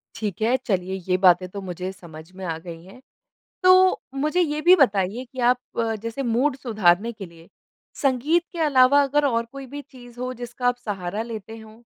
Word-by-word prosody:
ठीक 210 -3 -4
है, 230 +4 +3
चलिए 190 -7 -2 0.2
ये 185 - +3
बातें 185 -1 +4
तो 200 +1 -7
मुझे 185 0 -5
समझ 165 -3 -13
में 190 - -9
आ 165 -2 -3
गई 165 -1 -10
हैं। 195 +7 -15 0.6
तो 370 0 +5
मुझे 305 +6 0
ये 305 -3 0
भी 360 +2 +7
बताइए 215 - +1
कि 260 +1 -16
आप 250 - +1 0.4
जैसे 230 +4 -4
मूड 255 +4 +1
सुधारने 215 -3 +1
के 205 -3 -9
लिए 170 -1 -17 0.5
संगीत 280 +5 +2
के 345 - -8
अलावा 285 -1 +5
अगर 290 +1 +1
और 230 -3 0
कोई 275 -1 -8
भी 285 +3 -8
चीज़ 245 -3 -16
हो 255 0 -3
जिसका 245 +1 -4
आप 245 - +1
सहारा 195 +1 -3
लेते 225 -1 -8
हों? 220 +1 -15
235 Hz, 190 wpm, -23 LUFS, 190-275 Hz, 0.6 s, भी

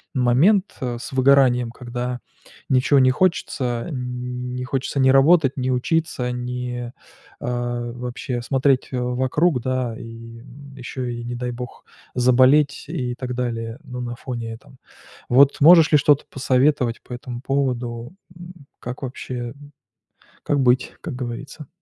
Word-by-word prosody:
момент, 140 - +4 0.2
э, 125 -2 -2
с - - -8
выгоранием, 130 -2 +4
когда 125 0 -5 0.5
ничего 130 +2 +4
не 130 -1 +5
хочется. 130 -7 0
Ни 125 -2 -4 0.3
не - - -3
хочется 135 +2 -2
ни 130 0 +5
работать, 140 0 +4
ни 130 0 -1
учиться, 130 -1 0
ни, 125 0 -4 0.5
а, 120 -1 -3
вообще 125 0 -4
смотреть 135 +1 +1
вокруг, 130 +4 +1
да, 130 -2 -2
и, 115 0 -10
м, 140 +3 -14
ещё 130 0 -6
и 120 -1 -4
не 120 +1 -5
дай 125 0 -3
бог 125 0 -8 0.3
заболеть 130 +4 +4
и 125 -2 -3
так 125 -1 -5
далее. 115 -1 -3
Ну, 125 -3 -7
на 120 -1 -4
фоне 120 -2 -5
этом. 125 +3 -15 0.5
Вот 135 +3 +5
можешь 165 +1 +8
ли 150 - +7
что-то 145 0 +3
посоветовать 130 -2 +1
по - - -17
этому 120 -1 -7
поводу? 125 -2 -2 0.2
М, 175 +1 -11 0.3
как 125 +3 -7
вообще, 130 0 -6 0.2
м, 145 +2 -15 0.7
как 145 -1 +1
быть, 125 0 +2
как 160 -7 -5
говорится? 125 +4 -7
125 Hz, 145 wpm, -22 LUFS, 120-135 Hz, 0.7 s, можешь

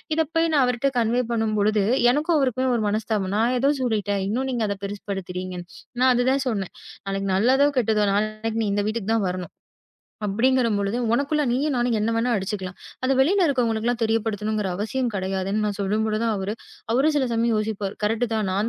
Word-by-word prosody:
இத 320 - +3
போய் 330 0 +2
நான் 290 -4 +4
அவர்கிட்ட 250 +2 +1
கன்வே 235 +2 +2
பண்ணும்பொழுது 215 -2 +1 0.3
எனக்கும் 310 +5 +1
அவருக்குமே 260 -2 +1
ஒரு 225 - 0
மனஸ்தாபம். 210 -2 -1
நான் 235 +3 +2
ஏதோ 275 +3 +3
சொல்லிட்டேன். 205 -5 0
இன்னும் 255 +6 -1
நீங்க 235 -3 0
அத 200 - -1
பெருசுபடுத்துறீங்க. 185 -2 -5 0.4
நான் 255 0 +5
அது 245 0 +1
தான் 270 0 0
சொன்னேன். 200 -5 -3 0.6
நல்லதோ 260 +8 +4
கெட்டதோ 215 -3 +2
நான் 215 +2 -1
இந்த 205 0 +1
வீட்டுக்கு 220 0 -1
தான் 210 -4 +1
வரணும். 180 -1 -5 0.7
அப்படிங்கிறபொழுது, 225 -1 +1 0.2
உனக்குள்ள 285 +4 +1
நீயும் 280 +5 0
நானும் 240 -1 +1
என்ன 215 +2 0
வேணா 235 +2 +1
அடிச்சுக்கலாம். 190 -2 -4 0.3
அத 260 - +2
வெளியில 365 +8 +4
இருக்கறவங்களுக்கு 235 -6 0
எல்லாம் 240 0 0
தெரியப்படுத்தணும்ங்கிற 215 -2 0
அவசியம் 245 +5 -1
கிடையாதுன்னு 195 +2 -1
நான் 205 -1 -2
சொல்லும்பொழுதுதான் 215 +3 0
அவரு 195 +1 -3 0.4
அவரும் 280 +6 +3
சில 280 -3 +2
சமயம் 230 0 +1
யோசிப்பாரு. 210 -2 -2
"கரெக்டா 225 +1 0
நான் 200 +4 0
225 Hz, 165 wpm, -24 LUFS, 205-250 Hz, 0.7 s, நான்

